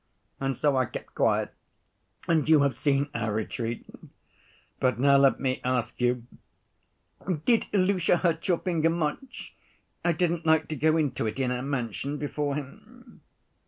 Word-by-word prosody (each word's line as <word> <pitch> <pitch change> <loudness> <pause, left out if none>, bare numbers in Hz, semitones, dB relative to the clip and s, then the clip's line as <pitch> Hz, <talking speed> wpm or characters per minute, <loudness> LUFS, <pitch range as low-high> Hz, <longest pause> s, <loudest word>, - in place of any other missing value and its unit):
And 135 -2 -2
so 145 -2 +2
I 130 -2 +2
kept - - -8
quiet, - - +1 0.7
and 160 -2 +2
you 155 -2 +6
have 140 -3 +1
seen 140 +2 0
our 115 -2 -2
retreat. 115 +2 -3 0.9
But 125 -3 +1
now 140 +1 +5
let 135 -1 +4
me 130 -1 -1
ask 125 -2 -1
you: 125 -1 +1 1.2
did 235 -2 +3
Ilusha 185 -3 +2
hurt 165 -2 0
your 180 -3 +3
finger 165 -3 0
much? 170 - -4 0.5
I 175 - +2
didn't 170 0 0
like 160 -1 +3
to 155 - -2
go 155 +2 +2
into 135 -7 0
it 110 - -4
in 130 -2 0
our 125 0 -2
mansion 135 +1 -3
before 145 -1 -2
him." 140 -2 -10
140 Hz, 155 wpm, -27 LUFS, 125-160 Hz, 1.2 s, you